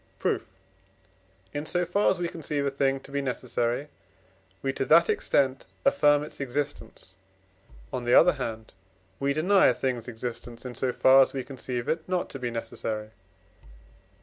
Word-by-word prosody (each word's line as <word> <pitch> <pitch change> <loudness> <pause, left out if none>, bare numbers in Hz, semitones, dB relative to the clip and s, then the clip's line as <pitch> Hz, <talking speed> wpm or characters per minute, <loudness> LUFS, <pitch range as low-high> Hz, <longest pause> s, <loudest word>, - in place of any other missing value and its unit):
Proof. - - -1 1.1
In 145 +1 -4
so 180 0 0
far 200 +4 +2
as 190 - +1
we 175 -1 -1
conceive 150 -4 -3
a 140 - 0
thing 135 0 +1
to 140 - -14
be 140 0 -1
necessary, 125 0 -2 0.8
we, 135 -1 0
to - - -1
that 170 +4 +6
extent, 135 -1 +1 0.2
affirm 145 +1 +4
its 150 - -9
existence; 140 -7 -4 0.8
on 125 - -2
the 120 +1 +3
other 180 +1 +7
hand 115 -5 -6 0.5
we 140 0 +1
deny 185 +7 +4
a 125 - +3
thing's 125 -3 -2
existence, 120 +1 -6
in 125 - -5
so 130 +1 0
far 130 +2 +6
as 135 - +2
we 135 -2 -3
conceive 125 -3 -5
it 160 +2 -2
not 180 -1 -1
to 135 - -7
be 125 -1 -2
necessary 115 -2 -4
(I. 95 -7 -31
135 Hz, 170 wpm, -27 LUFS, 120-145 Hz, 1.1 s, other